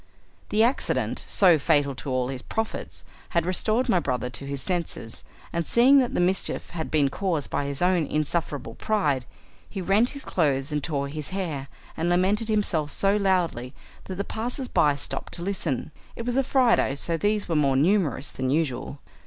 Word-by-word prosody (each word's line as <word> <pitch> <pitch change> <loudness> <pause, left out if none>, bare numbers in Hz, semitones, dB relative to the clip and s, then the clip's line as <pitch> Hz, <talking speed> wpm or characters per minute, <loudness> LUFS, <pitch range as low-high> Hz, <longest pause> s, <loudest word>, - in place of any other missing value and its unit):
The 215 +1 +3
accident, 245 +4 0
so 180 -5 +5
fatal 145 -2 +2
to 135 - -7
all 130 -1 0
his 130 -2 -5
profits, 220 +9 -4 0.3
had 170 - +3
restored 215 +7 +1
my 185 -7 +3
brother 125 -4 -2
to 140 +3 -5
his 140 0 -3
senses, 170 - -3 0.3
and 170 -1 -1
seeing 260 +4 +6
that 250 -2 0
the - - +1
mischief 180 +2 0
had 160 -2 -4
been 145 -3 +2
caused 165 -2 -2
by 145 - -1
his 140 +3 -2
own 180 -4 +2
insufferable 150 -5 -2
pride, 145 - 0 0.4
he 200 - -6
rent 200 +6 +3
his 280 - -9
clothes 140 -4 0
and 150 -1 -1
tore 140 -2 -1
his 150 0 -5
hair, 165 -8 -3 0.3
and 165 +2 -1
lamented 195 +5 +2
himself 180 -8 +1
so 195 +6 +2
loudly 180 - 0 0.3
that 185 - -5
the 200 - -2
passers 245 +5 -3
by 145 -10 +3
stopped 140 - -4
to 170 - -5
listen. 170 -9 -2 0.2
It 230 - -6
was 245 0 -1
a 270 - +4
Friday, 245 - +3
so 165 +4 0
these 205 +4 0
were 165 - -1
more 140 -3 +3
numerous 155 -1 +2
than 130 0 -2
usual. 140 -2 -1
170 Hz, 185 wpm, -25 LUFS, 140-200 Hz, 0.4 s, seeing